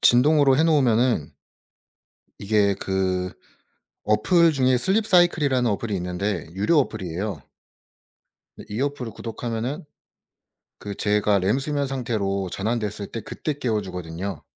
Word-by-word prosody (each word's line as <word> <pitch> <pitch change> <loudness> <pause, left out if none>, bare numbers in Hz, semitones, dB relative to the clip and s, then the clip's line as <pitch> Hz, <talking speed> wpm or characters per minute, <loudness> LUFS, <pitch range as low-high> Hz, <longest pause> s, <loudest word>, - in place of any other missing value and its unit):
진동으로 135 +2 +5
해 160 - +4
놓으면은 125 - +2 1.1
이게 100 -1 +2
그 95 -1 -1 0.7
어플 165 - +4
중에 130 -3 +3
슬립 205 - +1
사이클이라는 150 - +3
어플이 105 +1 -2
있는데 90 +3 -3
유료 105 - +2
어플이에요. 95 - -4 1.3
이 105 +3 -4
어플을 135 -5 -2
구독하면은 115 +5 -4 1.0
그 100 -1 -6
제가 105 -1 +2
램수면 135 +9 0
상태로 105 -7 -2
전환됐을 105 -1 -2
때 115 - -6
그때 150 +8 -4
깨워 120 -7 -1
주거든요. 90 -1 -6
110 Hz, 280 characters per minute, -24 LUFS, 100-135 Hz, 1.3 s, 진동으로